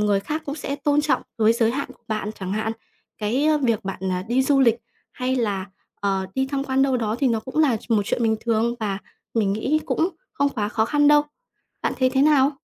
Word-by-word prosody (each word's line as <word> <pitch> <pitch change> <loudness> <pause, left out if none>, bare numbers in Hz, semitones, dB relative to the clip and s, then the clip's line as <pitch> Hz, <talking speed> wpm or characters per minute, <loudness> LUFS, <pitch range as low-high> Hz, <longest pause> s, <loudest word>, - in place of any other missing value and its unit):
người 205 -1 +2
khác 305 +10 -4
cũng 285 - -3
sẽ 280 -2 -4
tôn 290 +1 +2
trọng 295 -4 +1 0.2
với 220 0 +5
giới 230 -1 +2
hạn 280 +4 -3
của 235 - -33
bạn 215 -1 -2
chẳng 190 0 -3
hạn. 220 +1 -1 0.5
Cái, 225 +7 0
a, 310 0 +4
việc 230 -8 0
bạn, 195 -2 -5
ờ, 185 -1 -1
đi 250 +3 +3
du 275 0 +3
lịch 235 -3 +5 0.4
hay 255 +1 -1
là, 200 -5 -1 0.3
ờ, 195 -1 0
đi 265 0 +1
tham 275 0 -2
quan 265 -1 +2
đâu 270 -1 +2
đó 220 -2 -1
thì 275 - +2
nó 230 -2 +1
cũng 260 +6 -5
là 290 -7 +4
ch 220 - -14
một 215 -3 +3
chuyện 235 - -1
bình 220 -1 +2
thường 230 +1 +1
và 200 -3 -1 0.4
mình 210 -4 +2
nghĩ 265 +9 0
cũng 330 - +1 0.2
không 285 -10 +1
quá 215 -7 -2
khó 220 0 +1
khăn 290 +4 +3
đâu. 295 0 +6 0.6
Bạn - - 0
thấy 255 -1 +3
thế 265 +1 +2
nào? 285 -2 +5
240 Hz, 240 wpm, -23 LUFS, 215-280 Hz, 0.6 s, đâu